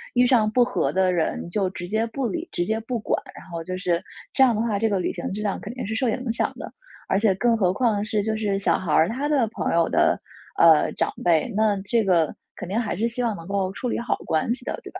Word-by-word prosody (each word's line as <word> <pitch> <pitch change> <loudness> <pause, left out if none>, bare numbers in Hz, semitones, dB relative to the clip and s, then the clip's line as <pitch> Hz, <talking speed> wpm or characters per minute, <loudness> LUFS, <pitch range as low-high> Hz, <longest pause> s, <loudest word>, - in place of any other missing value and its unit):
遇 250 0 +5
上 230 -4 +4
不 245 +2 +3
和 250 - 0
的 185 -1 +2
人 170 0 -1
就 195 -2 0
直 175 -1 -7
接 220 +3 0
不 255 +2 -2
理、 195 - -4
直 175 - -1
接 220 +2 -1
不 240 +2 -3
管， - - -1
然 - - -11
后 165 -1 -5
就 185 +2 -4
是 175 -2 0 0.3
这 270 - +5
样 240 -4 +4
的 220 - 0
话， 210 -4 0
这 225 0 +2
个 195 -2 +1
旅 - - -1
行 - - -5
质 210 +2 -4
量 200 - -1
肯 215 - -6
定 255 - -4
是 220 - -3
受 255 +1 0
影 250 +1 -2
响 230 - -1
的， - - -7 0.4
而 195 - +2
且 210 -3 +3
更 230 +2 +2
何 185 -3 +2
况 210 -2 +1
是， 210 -1 0
就 220 0 -1
是 200 -2 0
小 - - +2
孩 175 -5 -4
儿， 160 - +4
他 270 +6 -2
的 275 -7 +2
朋 215 - -2
友 170 -1 +3
的， - - +2 0.4
呃， 160 -2 +6
长 - - 0
辈， 170 +7 +3
那 215 -1 +3
这 225 +3 +1
个 170 -5 +2 0.2
肯 180 - -7
定 215 +4 0
还 220 -6 -2
是 225 +5 0
希 245 +2 -3
望 225 -3 0
能 165 +1 -10
够 195 -1 -1
处 250 +3 -3
理 - - -1
好 235 -1 -1
关 160 +9 +1
系 250 - -9
的， - - -3
对 - - -9
吧？ - - -8
210 Hz, 295 characters per minute, -24 LUFS, 185-235 Hz, 0.4 s, 呃